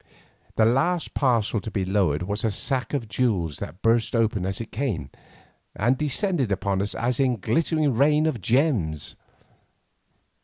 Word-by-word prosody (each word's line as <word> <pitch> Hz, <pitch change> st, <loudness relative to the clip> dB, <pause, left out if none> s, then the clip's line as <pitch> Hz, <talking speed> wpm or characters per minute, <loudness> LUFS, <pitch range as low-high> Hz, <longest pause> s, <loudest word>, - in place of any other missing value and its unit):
The 110 Hz, -, +4 dB
last 160 Hz, +9 st, +1 dB
parcel 115 Hz, -5 st, +1 dB
to 110 Hz, -, -6 dB
be 100 Hz, -3 st, -2 dB
lowered 90 Hz, -5 st, +1 dB
was 100 Hz, +3 st, -3 dB
a 115 Hz, -, +2 dB
sack 130 Hz, +6 st, -2 dB
of 120 Hz, -5 st, -3 dB
jewels 100 Hz, -, 0 dB
that 90 Hz, -, -8 dB
burst 115 Hz, +1 st, +2 dB
open 110 Hz, -5 st, +1 dB
as 95 Hz, 0 st, -2 dB
it 115 Hz, -, -7 dB
came, 110 Hz, -, -3 dB, 0.6 s
and 120 Hz, +5 st, +2 dB
descended 150 Hz, -, -1 dB
upon 100 Hz, -1 st, 0 dB
us 100 Hz, -, -1 dB
in 125 Hz, +2 st, +1 dB
a -, -, -4 dB
glittering 150 Hz, -, +1 dB
rain 150 Hz, +5 st, +3 dB
of 150 Hz, -9 st, -1 dB
gems. 115 Hz, -, 0 dB
115 Hz, 155 wpm, -25 LUFS, 100-135 Hz, 0.6 s, The